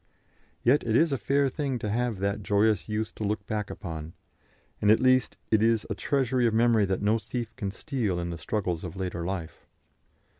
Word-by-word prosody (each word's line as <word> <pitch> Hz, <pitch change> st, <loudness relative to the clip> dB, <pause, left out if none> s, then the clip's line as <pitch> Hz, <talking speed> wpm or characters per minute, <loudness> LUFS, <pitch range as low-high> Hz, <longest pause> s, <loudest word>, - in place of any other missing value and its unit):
Yet 130 Hz, +5 st, +4 dB
it 115 Hz, -1 st, 0 dB
is 160 Hz, +4 st, +4 dB
a 135 Hz, -, +1 dB
fair 140 Hz, 0 st, +2 dB
thing 135 Hz, -1 st, -2 dB
to 105 Hz, -2 st, -4 dB
have 120 Hz, -1 st, 0 dB
that 100 Hz, +2 st, -1 dB
joyous 105 Hz, +1 st, +2 dB
youth 110 Hz, 0 st, -2 dB
to -, -, -6 dB
look 105 Hz, 0 st, -2 dB
back 105 Hz, -1 st, -3 dB
upon, 80 Hz, -4 st, -6 dB, 0.7 s
and 105 Hz, -, +3 dB
at 110 Hz, +1 st, +6 dB
least 130 Hz, 0 st, +3 dB
it 110 Hz, -1 st, +4 dB
is 115 Hz, -1 st, +3 dB
a -, -, +2 dB
treasury 125 Hz, +3 st, +1 dB
of 110 Hz, -, 0 dB
memory 115 Hz, -2 st, +4 dB
that 95 Hz, +1 st, -1 dB
no 110 Hz, +2 st, +3 dB
thief 115 Hz, -1 st, -5 dB
can 105 Hz, -5 st, -3 dB
steal 105 Hz, -, -2 dB
in 85 Hz, 0 st, -3 dB
the 85 Hz, -, -5 dB
struggles 90 Hz, -1 st, -2 dB
of 90 Hz, -1 st, -6 dB
later 90 Hz, -3 st, -3 dB
life. 85 Hz, -3 st, -5 dB
110 Hz, 200 wpm, -27 LUFS, 95-120 Hz, 0.7 s, at